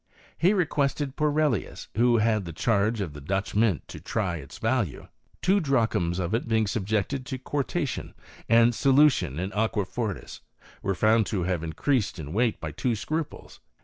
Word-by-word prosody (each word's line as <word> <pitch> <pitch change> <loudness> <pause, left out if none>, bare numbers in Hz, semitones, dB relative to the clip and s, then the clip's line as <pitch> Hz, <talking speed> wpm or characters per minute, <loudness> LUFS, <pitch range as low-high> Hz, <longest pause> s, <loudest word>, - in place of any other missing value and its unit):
He 180 +4 +3
requested 145 -5 0
Porelius, 150 -6 0
who 120 +1 +4
had 110 -2 +2
the 85 - -6
charge 110 +3 +1
of 85 -7 -4
the 75 - -9
Dutch 95 +7 -2
mint, 105 -6 +1
to - - -8
try 95 -6 -2
its 70 -4 -10
value. 115 - -1 0.4
Two 195 +2 +4
drachms 115 - +1
of 90 +1 -2
it 115 - 0
being 110 -1 +2
subjected 110 +6 -1
to 130 - -3
quartation, 140 +3 -3 0.3
and 115 +1 +6
solu 140 +4 +5
tion 70 - -3
in 95 +4 -3
aqua 105 -2 0
fortis, 110 0 -5 0.4
were 100 - -1
found 110 +3 +3
to 95 -5 -1
have 90 -2 -1
increased 105 - 0
in 75 -1 -6
weight 115 +1 +1
by - - -5
two 120 -3 -1
scruples. 150 +8 -5
110 Hz, 170 wpm, -26 LUFS, 95-130 Hz, 0.4 s, and